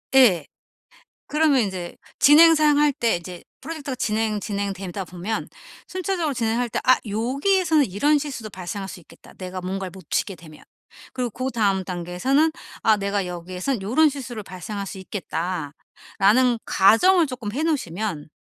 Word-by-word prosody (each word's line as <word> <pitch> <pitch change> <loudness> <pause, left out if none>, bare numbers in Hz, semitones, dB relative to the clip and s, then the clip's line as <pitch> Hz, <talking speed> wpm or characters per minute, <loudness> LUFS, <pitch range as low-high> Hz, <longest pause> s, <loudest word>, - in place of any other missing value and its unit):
예. 195 - +6 0.8
그러면 300 -3 +3
인제 185 -4 -4 0.2
진행 325 +3 +7
사항 300 -2 +4
할 295 0 +4
때 240 -7 0
이제 175 0 -8 0.2
프로젝트가 290 -2 -5
진행, 215 -2 -1
진행되다 200 -2 -4
보면 180 +5 -4 0.4
순차적으로 365 -5 -2
진행할 235 0 0
때 - - -2
'아. 255 -1 +5
요기에서는 285 - +2
이런 285 +11 +2
실수도 270 -7 -5
발생할 190 +1 -6
수 190 - -9
있겠다 160 - -18
내가 185 0 -7
뭔가를 190 0 -4
놓치게 190 +2 -3
되면.' 155 -2 -15 0.5
그리고 250 -2 -2
고 255 +4 -3
다음 200 -4 +1
단계에서는 180 - 0 0.3
'아 220 -1 +4
내가 200 -1 -1
여기에선 180 +7 -4
요런 290 +10 +4
실수를 255 -5 -6
발생할 195 +2 -6
수 195 - -7
있겠다.'라는 190 - -1
가정을 330 - +5
쪼끔 250 -6 -5
해 285 - -2
놓으시면 205 - -2
215 Hz, 345 characters per minute, -23 LUFS, 185-275 Hz, 0.8 s, 진행